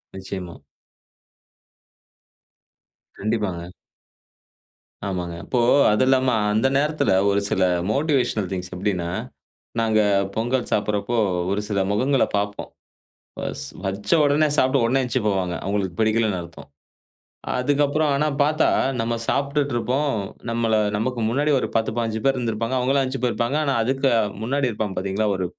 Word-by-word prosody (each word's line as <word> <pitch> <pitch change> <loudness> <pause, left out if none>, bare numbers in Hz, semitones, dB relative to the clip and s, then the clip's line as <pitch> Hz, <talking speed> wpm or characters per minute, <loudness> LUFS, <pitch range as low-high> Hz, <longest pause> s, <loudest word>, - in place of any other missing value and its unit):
நிச்சயமாங்க. 95 -2 -7 2.6
கண்டிப்பாங்க. 100 -5 -2 1.4
ஆமாங்க. 90 -3 -3
இப்போ 125 - 0 0.3
அது 105 +4 +3
இல்லாம 130 -1 +3 0.2
அந்த 110 +5 +3
நேரத்துல 150 0 +1 0.2
ஒரு 100 0 +2
சில 95 - 0 0.3
மோட்டிவேஷனல் 130 - +1
திங்க்ஸ் 90 -1 -4
எப்டின்னா, 90 -2 -1 0.7
நாங்க 110 -1 +2 0.4
பொங்கல் 120 +3 0
சாப்டுறப்போ 105 +2 0 0.3
ஒரு 100 +1 0
சில 100 -2 0
முகங்கள 130 +6 +2
பாப்போம். 100 0 -3 0.7
வஸ் - - -4 0.2
வச்ச 100 +2 -3
உடனே 145 +2 +3
சாப்ட்டு 130 0 +3
உடனே 130 +3 +2
எந்திரிச்சி 125 +1 0
போவாங்க. 95 -3 0
அவங்களுக்கு 100 -2 -1
பிடிக்கலன்னு 110 -3 +2
அர்த்தம். 85 -3 -12 0.9
அதுக்கப்புறம் 145 +3 +1
ஆனா 145 +2 +1 0.2
பாத்தா 155 +2 +2 0.3
நம்ம 115 +1 -1
சாப்ட்டுட்டு 140 0 0
இருப்போம். 135 +5 0 0.4
நம்மள 115 -1 +1 0.2
நமக்கு 120 +3 -2
முன்னாடி 145 +6 +1
ஒரு - - -2
10, 110 0 +1
15 115 -1 -1
ப்பேரு 135 -1 +2
இருந்திருப்பாங்க. 115 0 -2
அவங்கள 135 +2 +2
எந்திரிச்சி 130 0 -3
போயிருப்பாங்க. 120 +2 0
ஆனா 140 -2 +1
அதுக்கு 135 +3 +1 0.3
முன்னாடி 135 +3 0
இருப்பாங்க 105 -3 -3
பாத்தீங்களா, 100 +3 -1
ஒரு 95 - -2
115 Hz, 125 wpm, -23 LUFS, 100-135 Hz, 2.6 s, அது